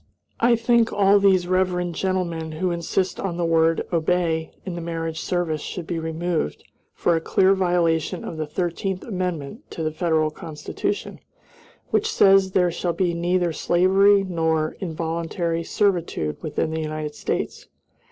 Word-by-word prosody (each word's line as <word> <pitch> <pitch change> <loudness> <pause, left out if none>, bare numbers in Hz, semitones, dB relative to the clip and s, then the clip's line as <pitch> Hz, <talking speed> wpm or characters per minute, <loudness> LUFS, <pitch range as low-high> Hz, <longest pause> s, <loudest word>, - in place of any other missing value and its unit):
I 235 +1 +4
think 230 0 +2
all 200 0 +4
these 190 -3 +3
reverend 180 -1 +1
gentlemen 170 -3 -2
who 180 +3 -1
insist 170 +2 -1
on 180 -3 -3
the 175 - 0
word 165 0 +2
"obey" 165 -1 +1
in 185 - -4
the 170 - -5
marriage 165 -1 -3
service 170 -4 -1
should 180 - -6
be 170 0 -3
removed 160 - -2 0.3
for 170 - +2
a 165 - 0
clear 190 +3 +3
violation 175 -2 +1
of 165 - -6
the 155 -1 -3
Thirteenth 180 +4 -2
Amendment 185 - -4
to 165 - -5
the 155 - 0
Federal 155 -1 +1
Constitution, 155 -1 -4 0.7
which 435 +1 +1
says 195 - +5
there 180 -2 +3
shall 170 0 -2
be 175 0 0
neither 175 0 0
slavery 195 +5 +4
nor 160 -4 0
involuntary 165 0 -2
servitude 170 - 0
within 155 +1 -2
the 160 0 -2
United 155 -1 -4
States. - - -3
170 Hz, 150 wpm, -23 LUFS, 160-185 Hz, 0.7 s, says